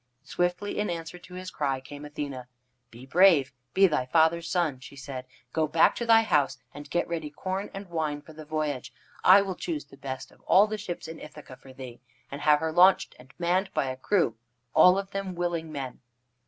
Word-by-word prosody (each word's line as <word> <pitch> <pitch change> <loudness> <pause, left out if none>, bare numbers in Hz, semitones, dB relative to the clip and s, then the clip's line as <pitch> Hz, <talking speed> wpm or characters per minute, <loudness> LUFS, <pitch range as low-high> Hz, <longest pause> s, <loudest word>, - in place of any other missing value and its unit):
Swiftly, 175 +7 -2
in 210 - 0
answer 170 0 -5
to 180 +1 -13
his 185 0 -7
cry, 135 -3 -1
came 145 +2 -10
Athene. 145 -4 -6 0.4
"Be 120 +3 -13
brave. 155 -3 +5 0.2
Be 195 - +6
thy 150 -8 +1
father's 165 +3 +2
son," 165 -8 0
she 130 - -12
said. 135 -2 -7 0.3
"Go 160 -1 +1
back 160 +2 +4
to 235 - -3
thy 225 0 +6
house 145 - +1 0.2
and 145 +1 -10
get 175 - 0
ready 160 -3 -4
corn 190 +6 -4
and 195 0 -8
wine 155 -4 -3
for 160 - -14
the 155 0 -10
voyage. 150 -4 -3 0.3
I 195 +2 +8
will 195 -1 -3
choose 160 -4 -4
the 140 - -17
best 135 -1 -6
of - - -23
all 195 +3 +6
the 215 0 -4
ships 175 -3 -6
in 160 0 -8
Ithaca 145 -4 -11
for 130 - -15
thee, 130 -2 -10 0.3
and 140 +1 -6
have 150 0 +4
her 160 0 -1
launched, 180 +3 +4
and 130 +1 -16
manned 180 +3 0
by 135 - 0
a - - -5
crew, 130 - +1 0.4
all 180 +1 +7
of 195 0 -4
them 195 -2 -4
willing 170 -2 -2
men." 135 -4 -6
160 Hz, 210 wpm, -27 LUFS, 140-180 Hz, 0.4 s, I